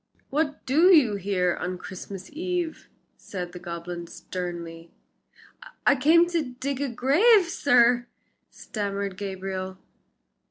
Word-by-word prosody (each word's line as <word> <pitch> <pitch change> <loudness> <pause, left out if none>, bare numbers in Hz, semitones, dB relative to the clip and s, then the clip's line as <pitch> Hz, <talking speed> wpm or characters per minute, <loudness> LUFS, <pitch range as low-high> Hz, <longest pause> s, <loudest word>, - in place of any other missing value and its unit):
"What 290 0 -1
do 310 +7 +4
you 300 - +6
here 185 -2 0
on 180 +1 -3
Christmas 190 +2 -9
Eve?" 350 0 -3 0.3
said 180 -3 -6
the 180 - -9
goblin, 170 0 -6
sternly. 170 -2 -7 1.0
"I 285 - +6
came 320 +6 +5
to 315 -8 -2
dig 275 0 -2
a 285 - -1
grave, 340 - +4
sir," 245 -6 +3 0.4
stammered 200 -2 -4
Gabriel. 190 -1 -5
205 Hz, 115 wpm, -26 LUFS, 185-290 Hz, 1.0 s, you